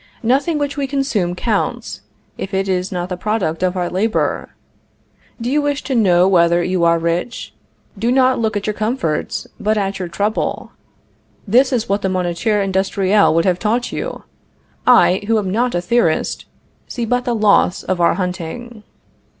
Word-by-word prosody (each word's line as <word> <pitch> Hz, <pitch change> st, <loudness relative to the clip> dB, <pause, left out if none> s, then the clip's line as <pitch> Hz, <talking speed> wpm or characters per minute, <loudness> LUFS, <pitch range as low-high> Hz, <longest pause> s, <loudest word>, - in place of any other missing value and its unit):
Nothing 275 Hz, +7 st, +1 dB
which 285 Hz, 0 st, -2 dB
we 280 Hz, -1 st, -1 dB
consume 250 Hz, -11 st, -1 dB
counts, 215 Hz, +2 st, -2 dB, 0.3 s
if 195 Hz, 0 st, -5 dB
it 195 Hz, +1 st, 0 dB
is 185 Hz, 0 st, -1 dB
not 175 Hz, -1 st, -3 dB
the 180 Hz, -, -2 dB
product 180 Hz, -4 st, -2 dB
of 185 Hz, 0 st, 0 dB
our 175 Hz, -1 st, 0 dB
labor. 210 Hz, +5 st, -1 dB, 0.9 s
Do 235 Hz, -, -4 dB
you 290 Hz, +4 st, +2 dB
wish 290 Hz, 0 st, -1 dB
to 270 Hz, -, -3 dB
know 185 Hz, -6 st, +4 dB
whether 170 Hz, -2 st, +3 dB
you 180 Hz, -1 st, 0 dB
are 170 Hz, 0 st, +4 dB
rich? 170 Hz, +9 st, -3 dB, 0.5 s
Do 230 Hz, +3 st, +1 dB
not 260 Hz, -1 st, +3 dB
look 220 Hz, -2 st, 0 dB
at 205 Hz, -, -4 dB
your 215 Hz, -, -1 dB
comforts, 215 Hz, -, -2 dB
but 215 Hz, +1 st, 0 dB
at 195 Hz, -1 st, -2 dB
your 180 Hz, -, -3 dB
trouble." 205 Hz, +6 st, -2 dB, 0.8 s
This 255 Hz, +6 st, +4 dB
is 235 Hz, -3 st, 0 dB
what 200 Hz, +1 st, 0 dB
the 190 Hz, -, 0 dB
Moniteur 185 Hz, +3 st, 0 dB
Industriel 195 Hz, +1 st, +2 dB
would 165 Hz, -, +2 dB
have 180 Hz, -2 st, +1 dB
taught 230 Hz, +3 st, -1 dB
you. -, -, -5 dB, 0.6 s
I, 240 Hz, -6 st, +5 dB
who 225 Hz, 0 st, +3 dB
am 195 Hz, -3 st, -1 dB
not 240 Hz, +2 st, 0 dB
a 175 Hz, -, 0 dB
theorist, 175 Hz, -4 st, 0 dB, 0.4 s
see 240 Hz, -, -3 dB
but 245 Hz, +2 st, 0 dB
the 240 Hz, -, 0 dB
loss 205 Hz, -3 st, +3 dB
of 185 Hz, -2 st, -1 dB
our 170 Hz, -, +3 dB
hunting. 190 Hz, +6 st, -5 dB
200 Hz, 175 wpm, -18 LUFS, 180-240 Hz, 0.9 s, I